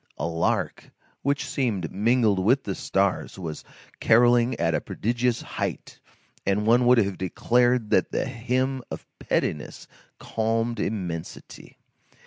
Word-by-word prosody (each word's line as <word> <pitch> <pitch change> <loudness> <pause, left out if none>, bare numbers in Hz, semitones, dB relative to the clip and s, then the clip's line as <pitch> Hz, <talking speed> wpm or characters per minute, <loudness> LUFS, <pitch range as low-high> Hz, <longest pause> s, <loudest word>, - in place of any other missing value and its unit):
A 75 - -2
lark, 85 0 -1 0.3
which 140 +1 -1
seemed 115 - -1
mingled 110 -1 +2
with 125 +9 +3
the 100 - -3
stars, 95 0 -1
was 80 -5 -6 0.4
carolling 120 +1 +4
at 85 0 +1
a - - 0
prodigious 120 +2 -1
height, - - -5 0.4
and 100 +2 0
one 120 +2 +4
would 125 0 +6
have 100 -4 +1
declared 120 +5 +1
that - - +2
that - - -1
hymn 130 +1 -1
of - - -7
pettiness 75 - -2 0.3
calmed 115 +1 -1
immensity. 90 -6 -5
115 Hz, 125 wpm, -25 LUFS, 95-125 Hz, 0.4 s, would